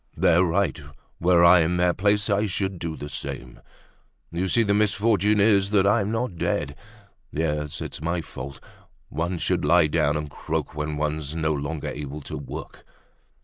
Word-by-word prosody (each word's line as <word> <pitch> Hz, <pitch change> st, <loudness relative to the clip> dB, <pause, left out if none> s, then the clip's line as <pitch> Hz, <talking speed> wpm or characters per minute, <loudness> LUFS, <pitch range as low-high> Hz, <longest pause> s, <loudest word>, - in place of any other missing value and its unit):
They're 85 Hz, +2 st, +4 dB
right; 90 Hz, -1 st, 0 dB, 0.4 s
were 85 Hz, 0 st, +4 dB
I 85 Hz, +1 st, +8 dB
in 85 Hz, +2 st, +1 dB
their 90 Hz, 0 st, +3 dB
place 100 Hz, +2 st, +1 dB
I 105 Hz, 0 st, +1 dB
should 95 Hz, -1 st, -2 dB
do 80 Hz, -2 st, -4 dB
the 75 Hz, -, -6 dB
same. 65 Hz, -3 st, -6 dB, 0.7 s
You 90 Hz, +3 st, -1 dB
see, 115 Hz, +5 st, +3 dB
the 100 Hz, -2 st, +1 dB
misfortune 105 Hz, 0 st, +2 dB
is 100 Hz, -2 st, +4 dB
that 100 Hz, -2 st, +3 dB
I'm 100 Hz, 0 st, +2 dB
not 115 Hz, -5 st, -2 dB
dead. -, -, -1 dB, 0.6 s
Yes, 75 Hz, -1 st, -2 dB
it's -, -, -6 dB
my 85 Hz, +2 st, -1 dB
fault. 70 Hz, -2 st, -8 dB, 0.5 s
One 85 Hz, +4 st, -2 dB
should -, -, 0 dB
lie 85 Hz, -1 st, +5 dB
down 75 Hz, 0 st, +1 dB
and 75 Hz, 0 st, -4 dB
croak -, -, -4 dB
when 75 Hz, 0 st, -3 dB
one's 75 Hz, 0 st, -2 dB
no 80 Hz, -1 st, 0 dB
longer 75 Hz, +1 st, -3 dB
able 75 Hz, 0 st, -6 dB
to -, -, -7 dB
work." 70 Hz, -, -8 dB
85 Hz, 170 wpm, -25 LUFS, 75-100 Hz, 0.7 s, I